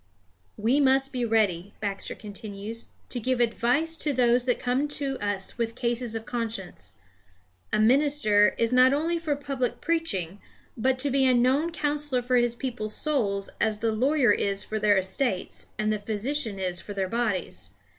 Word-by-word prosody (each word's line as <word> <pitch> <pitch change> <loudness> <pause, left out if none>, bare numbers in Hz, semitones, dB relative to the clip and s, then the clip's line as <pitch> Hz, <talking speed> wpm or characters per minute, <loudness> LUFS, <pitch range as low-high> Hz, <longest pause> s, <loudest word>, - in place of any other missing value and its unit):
"We 235 +7 +2
must 270 0 +3
be 250 -2 -1
ready," 205 -4 0
Baxter 200 -2 -4
continues, 210 +2 -8 0.2
"to 245 - -3
give 255 +2 -1
advice 245 +7 +1
to 300 - 0
those 245 -1 +3
that 245 -2 +1
come 255 +4 0
to 280 -2 -3
us 205 +2 -3
with 230 -1 -1
cases 240 -1 -1
of 225 0 -5
conscience. 220 - -4 0.8
A - - +1
minister 230 -4 +4
is 230 +1 +1
not 255 +1 +6
only 335 +3 0
for 310 -3 -1
public 275 -3 -3
preaching, 205 - -1 0.3
but 260 +3 +1
to 280 +2 0
be 265 0 +3
a 255 - +4
known 265 +7 +2
counsellor 295 -5 -1
for 250 0 +2
his 240 -1 +2
people's 235 -4 -3
souls 210 -10 0
as 220 -1 +1
the 225 +1 0
lawyer 255 +2 +3
is 200 -1 +1
for 215 - -3
their 205 -1 +4
estates, 190 +2 0
and 215 0 0
the 210 - -2
physician 220 +2 -1
is 180 -2 -2
for 205 - -8
their 190 -1 -1
bodies. 220 -3 -2
240 Hz, 170 wpm, -26 LUFS, 210-270 Hz, 0.8 s, not